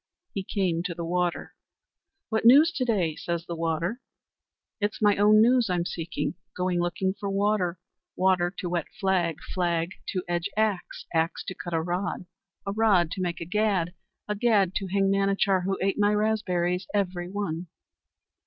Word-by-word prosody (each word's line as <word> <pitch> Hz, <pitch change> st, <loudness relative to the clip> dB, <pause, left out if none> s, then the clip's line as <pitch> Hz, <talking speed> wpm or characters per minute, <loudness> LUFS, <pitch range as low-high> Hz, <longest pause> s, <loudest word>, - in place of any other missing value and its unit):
He 195 Hz, -, -2 dB
came 185 Hz, -4 st, 0 dB
to 175 Hz, -2 st, -3 dB
the 170 Hz, 0 st, -4 dB
water. 175 Hz, 0 st, -1 dB, 0.8 s
"What 220 Hz, -1 st, 0 dB
news 285 Hz, +8 st, +7 dB
to 260 Hz, -6 st, -1 dB
day?" 185 Hz, -10 st, +1 dB
says 170 Hz, 0 st, -3 dB
the 170 Hz, -, -5 dB
water. 165 Hz, +8 st, -2 dB, 0.8 s
"It's 210 Hz, 0 st, -1 dB
my 205 Hz, -2 st, +4 dB
own 210 Hz, +1 st, +6 dB
news 240 Hz, -2 st, +4 dB
I'm 175 Hz, -1 st, 0 dB
seeking. 170 Hz, -1 st, -3 dB, 0.2 s
Going 180 Hz, -1 st, 0 dB
looking 190 Hz, +2 st, -1 dB
for 200 Hz, 0 st, -5 dB
water, 195 Hz, -3 st, +1 dB, 0.4 s
water 180 Hz, -2 st, +2 dB
to 180 Hz, -, -3 dB
wet 175 Hz, -2 st, -2 dB
flag, 185 Hz, -4 st, +1 dB, 0.2 s
flag 170 Hz, -1 st, 0 dB, 0.2 s
to 185 Hz, -2 st, -2 dB
edge 175 Hz, -1 st, -1 dB
axe, 215 Hz, -4 st, -1 dB
axe 165 Hz, 0 st, 0 dB
to 185 Hz, -, -5 dB
cut 175 Hz, -2 st, -5 dB
a 160 Hz, -, +1 dB
rod, 180 Hz, +2 st, -2 dB, 0.4 s
a 200 Hz, -, -1 dB
rod 200 Hz, -6 st, +3 dB
to 190 Hz, -, -3 dB
make 175 Hz, -2 st, -2 dB
a -, -, -3 dB
gad, 195 Hz, -3 st, 0 dB, 0.3 s
a 210 Hz, -, 0 dB
gad 205 Hz, -4 st, +2 dB
to 195 Hz, -, -3 dB
hang 195 Hz, +1 st, +2 dB
Manachar, 195 Hz, -1 st, +2 dB
who 195 Hz, 0 st, 0 dB
ate 195 Hz, +2 st, 0 dB
my 205 Hz, 0 st, +3 dB
raspberries 185 Hz, -4 st, 0 dB
every 180 Hz, -3 st, -1 dB
one." 180 Hz, -4 st, -3 dB
185 Hz, 170 wpm, -27 LUFS, 175-205 Hz, 0.8 s, news